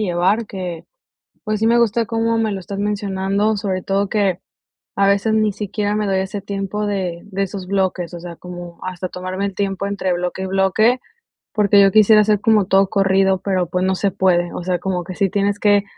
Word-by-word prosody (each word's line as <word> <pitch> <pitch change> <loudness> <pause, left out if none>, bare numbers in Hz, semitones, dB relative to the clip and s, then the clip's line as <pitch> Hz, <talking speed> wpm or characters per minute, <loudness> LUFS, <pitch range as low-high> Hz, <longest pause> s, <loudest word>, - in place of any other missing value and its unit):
llevar, 190 +3 +1
que 180 -4 -6 0.6
pues 215 -1 -2
sí 220 - +1
me 235 +1 +4
gusta 230 0 +2
cómo 230 0 0
me 220 -2 0
lo 195 - -4
estás 195 +2 -7
mencionando, 200 +1 0
sobre 190 -2 -2
todo 195 +1 0
que 195 -3 +1 0.6
a 195 0 +3
veces 200 +2 +2
ni 215 -1 +2
siquiera 205 +1 -2
me 210 0 0
doy 195 -1 +1
ese 190 +2 -4
tiempo 200 +1 -3
de 185 -4 -3
de 195 -1 -3
esos 195 -1 -5
bloques, 185 -3 -1
o 170 - -7
sea, 170 -1 -8
como 175 -1 -9
hasta 185 0 -4
tomarme 185 +2 -4
el 200 - -5
tiempo 200 -1 -2
entre 195 -2 -1
bloque 180 +1 -3
y - - -2
bloque, 195 +6 +2 0.5
porque 205 -1 +4
yo 195 -1 +5
quisiera 215 +1 +6
hacer 210 -1 +2
como 215 -2 +3
todo 195 0 +3
corrido, 195 -1 +2
pero 185 -3 -1
pues 180 +2 -1
no 190 0 +1
se 200 +1 0
puede, 180 -3 +1
o 175 - -5
sea 180 -1 0
como 180 -1 -2
que 185 - -7
sí 200 -1 +2
tienes 200 +1 0
que 205 -1 +4
195 Hz, 210 wpm, -19 LUFS, 185-210 Hz, 0.6 s, quisiera